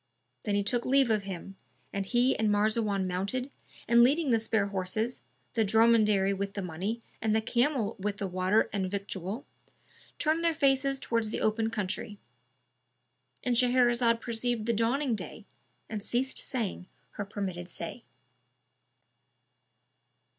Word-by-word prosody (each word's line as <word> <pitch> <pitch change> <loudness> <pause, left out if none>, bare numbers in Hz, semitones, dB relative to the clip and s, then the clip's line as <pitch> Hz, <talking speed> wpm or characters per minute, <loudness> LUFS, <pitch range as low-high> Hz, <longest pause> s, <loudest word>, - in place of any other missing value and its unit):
Then 205 - +1
he 205 - +2
took 240 +4 0
leave 270 -2 +3
of 210 -2 +1
him, 195 0 -7 0.4
and 195 -1 -2
he 245 +4 +3
and 220 -1 +1
Marzawan 205 -1 +1
mounted 200 +9 -2 0.4
and 235 +1 +6
leading 280 +3 +4
the 230 - +4
spare 220 -2 +1
horses, 200 +5 -2 0.3
the 230 -3 +2
dromedary 215 -2 +4
with 200 0 -4
the 200 - -3
money 185 +7 -3 0.2
and 220 -1 +1
the - - +4
camel 235 0 0
with 200 +1 -2
the 200 - -3
water 185 +3 +2
and 190 -2 -1
victual, 200 +3 -4 0.7
turned 320 +1 +1
their 335 -1 +2
faces 275 -2 +2
towards 230 -4 -1
the - - -3
open 220 +1 +1
country;—And 130 - -7
Shahrazad 240 -1 +3
perceived 235 -1 -1
the 235 - +1
dawning 240 +4 +1
day 210 +1 -6 0.4
and 215 -2 -4
ceased 250 +5 -1
saying 210 -7 -3 0.2
her 205 - -4
permitted 190 -3 -5
say. 175 +8 -6
215 Hz, 140 wpm, -29 LUFS, 195-240 Hz, 0.7 s, and